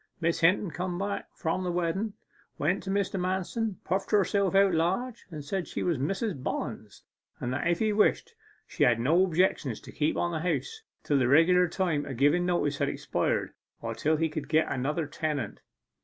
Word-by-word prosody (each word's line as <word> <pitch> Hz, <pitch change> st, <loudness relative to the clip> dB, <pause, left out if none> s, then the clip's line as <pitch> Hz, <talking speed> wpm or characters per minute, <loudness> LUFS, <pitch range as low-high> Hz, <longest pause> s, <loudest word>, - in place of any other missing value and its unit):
Miss 170 Hz, 0 st, 0 dB
Hinton 175 Hz, +2 st, +3 dB
came 180 Hz, +1 st, -3 dB
back 200 Hz, +2 st, -3 dB
from 175 Hz, +2 st, -1 dB
the 180 Hz, -, -1 dB
wedden, 180 Hz, +5 st, -1 dB, 0.4 s
went 175 Hz, +7 st, 0 dB
to 190 Hz, -, -7 dB
Mr. 195 Hz, -1 st, 0 dB
Manston, 190 Hz, +4 st, -1 dB
puffed 195 Hz, +1 st, -1 dB
herself 200 Hz, -2 st, +2 dB
out 195 Hz, -1 st, +5 dB
large, 190 Hz, +10 st, -1 dB
and 150 Hz, -4 st, -8 dB
said 185 Hz, +2 st, -2 dB
she -, -, -4 dB
was 170 Hz, -7 st, 0 dB
Mrs. 185 Hz, -, -2 dB
Bollens, -, -, -5 dB, 0.4 s
but 125 Hz, -, -3 dB
that 135 Hz, +6 st, -1 dB
if 170 Hz, 0 st, +2 dB
he 215 Hz, +1 st, +1 dB
wished, 210 Hz, 0 st, +2 dB, 0.3 s
she -, -, -1 dB
had 120 Hz, -2 st, +4 dB
no 160 Hz, +10 st, +4 dB
objection 170 Hz, -8 st, +1 dB
to -, -, -12 dB
keep 150 Hz, +1 st, 0 dB
on 175 Hz, -, 0 dB
the 160 Hz, -, -2 dB
house 180 Hz, -, -2 dB, 0.2 s
till 145 Hz, -2 st, +2 dB
the 130 Hz, -, +2 dB
regular 175 Hz, +6 st, +5 dB
time 165 Hz, -5 st, -1 dB
of 135 Hz, -, -5 dB
giving 145 Hz, +7 st, +3 dB
notice 145 Hz, -5 st, 0 dB
had -, -, +1 dB
expired, -, -, -1 dB, 0.3 s
or -, -, -4 dB
till 155 Hz, +1 st, +1 dB
he 165 Hz, +1 st, +1 dB
could 155 Hz, -2 st, -5 dB
get 155 Hz, 0 st, +2 dB
another 150 Hz, +5 st, -1 dB
tenant. 145 Hz, -5 st, -3 dB
175 Hz, 190 wpm, -28 LUFS, 150-190 Hz, 0.4 s, out